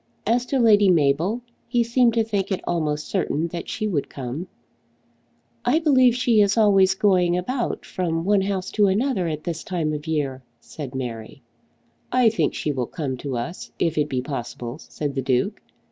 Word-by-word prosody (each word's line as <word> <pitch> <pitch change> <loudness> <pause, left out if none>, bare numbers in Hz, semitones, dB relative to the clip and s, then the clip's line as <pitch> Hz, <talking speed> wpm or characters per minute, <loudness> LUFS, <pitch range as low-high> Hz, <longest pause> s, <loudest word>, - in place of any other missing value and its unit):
As 245 +2 +1
to 275 - 0
Lady 210 -5 +5
Mabel, 165 - +2 0.3
he 240 0 +2
seemed 235 0 +3
to 225 - +3
think 200 -3 -2
it 190 - -1
almost 150 -3 -1
certain 170 -4 -1
that 170 0 -6
she 215 - -2
would 160 -9 -1
come. 135 +6 -5 1.2
"I 250 +6 +3
believe 260 -7 +4
she 240 -3 +3
is 205 +2 +2
always 195 -3 +5
going 180 -3 +3
about 240 +7 -2
from 165 -3 -2
one 205 0 +3
house 190 -1 -2
to 210 -2 +3
another 200 -1 +1
at 155 -1 -4
this 165 -2 -4
time 165 -4 -2
of 150 - -3
the 160 +1 -5
year," 135 -4 -1 0.2
said 135 +1 -8
Mary. 120 -1 -6 0.7
"I 250 -2 +5
think 165 -9 0
she 150 - -1
will 130 -4 -2
come 145 -6 -4
to 130 -1 -4
us 165 +10 -6
if 165 -2 0
it 150 -1 0
be 125 -2 -1
possible," 125 -1 -5
said 145 -3 -5
the 135 - -1
Duke. 130 - 0
175 Hz, 185 wpm, -23 LUFS, 150-215 Hz, 1.2 s, Lady